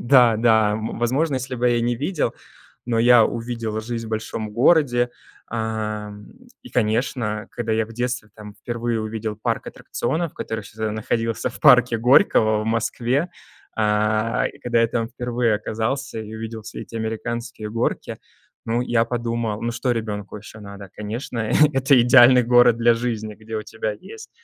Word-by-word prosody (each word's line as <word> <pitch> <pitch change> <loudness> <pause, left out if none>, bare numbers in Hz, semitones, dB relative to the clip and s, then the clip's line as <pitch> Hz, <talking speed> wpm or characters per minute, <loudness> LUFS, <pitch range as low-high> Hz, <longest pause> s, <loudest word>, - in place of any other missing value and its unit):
Да, 120 -3 +5
да, 110 -2 +3
м, 110 +1 -4
возможно, 135 +5 +1
если 130 0 -3
бы 125 0 +1
я 120 -1 +2
не 120 0 0
видел, 150 +5 -1 0.5
но 115 -2 0
я 120 -1 +6
увидел 115 -2 -3
жизнь 115 0 -5
в - - -9
большом 110 0 -4
городе, 120 0 +3 0.4
эм, 105 -2 -4 0.3
и, 255 - -12
конечно, 110 -2 -1
когда 115 -2 -3
я 110 0 +1
в 115 - -12
детстве 120 -2 -3
там 105 -1 -11
впервые 120 -1 -3
увидел 110 -1 -4
парк 110 - -2
аттракционов, 165 0 -3
который 110 -1 -4
ещё 105 +1 -14
тогда 110 -1 -2
находился 115 +1 -1
в - - -12
парке 115 - +6
Горького 110 - +4
в - - -6
Москве. 120 +6 0 0.5
Э, 110 +1 +1
и - - -17
когда 120 -1 +1
я 115 - +4
там 115 0 -2
впервые 120 -2 -1
оказался 115 +4 -3
и 110 0 -8
увидел 110 0 -6
все 110 - -8
эти - - -14
американские 110 0 -4
горки, 115 +1 -2 0.5
ну, 115 +2 0
я 120 -2 +2
подумал: 115 -2 -2
"Ну 120 - -1
что 125 +2 -1
ребенку 105 -3 -4
ещё 110 +1 -12
надо?" 100 -1 -10
Конечно, 115 +4 -5 0.3
это 135 -1 +4
идеальный 125 +1 +7
город 120 -1 +5
для 120 0 +4
жизни, 115 -3 -3
где 110 +1 -7
у 110 - -3
тебя 110 -1 -4
есть 435 - -12
115 Hz, 165 wpm, -22 LUFS, 110-120 Hz, 0.5 s, идеальный